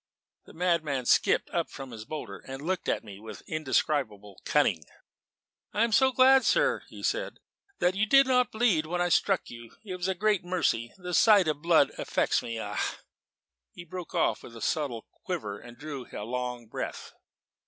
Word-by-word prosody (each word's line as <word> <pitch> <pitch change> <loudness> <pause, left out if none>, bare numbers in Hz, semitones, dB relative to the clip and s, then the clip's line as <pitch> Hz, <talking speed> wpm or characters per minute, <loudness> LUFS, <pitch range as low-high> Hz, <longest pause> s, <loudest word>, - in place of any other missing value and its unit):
The - - -15
madman 160 -7 0
skipped - - +3
up - - -1
from 135 -2 -9
his 110 -2 -8
boulder, 155 +5 -6
and 135 0 -6
looked 185 +1 -1
at - - 0
me 100 -3 -11
with 110 -1 -10
indescribable 130 -9 -1
cunning. 105 - +2 0.9
"I 210 - +2
am 230 - +1
so 265 +4 +4
glad, 260 +1 +6
sir," - - +2
he - - -11
said, - - -1 0.4
"that 180 +1 +2
you 205 +3 0
did 275 +3 +6
not 250 -2 +2
bleed 215 -9 +2
when 175 +2 -2
I 175 0 +1
struck 195 +2 +1
you; 115 -1 -11
it 185 -3 -5
was 180 0 -2
a 190 - 0
great 205 0 +1
mercy. 160 -10 0
The 180 -1 -6
sight 205 -2 +6
of 150 -1 -1
blood 165 -4 +4
affects - - +1
me 115 -1 -5
ah!" - - -3 0.9
he 175 - -10
broke 180 +1 -8
off 170 - +1
with 115 - -12
a - - -9
subtle 135 -8 -2 0.2
quiver 110 - -4
and 120 0 -13
drew 140 -3 -7
a 105 - -6
long 125 0 -4
breath. 110 - -6
155 Hz, 185 wpm, -28 LUFS, 120-190 Hz, 0.9 s, glad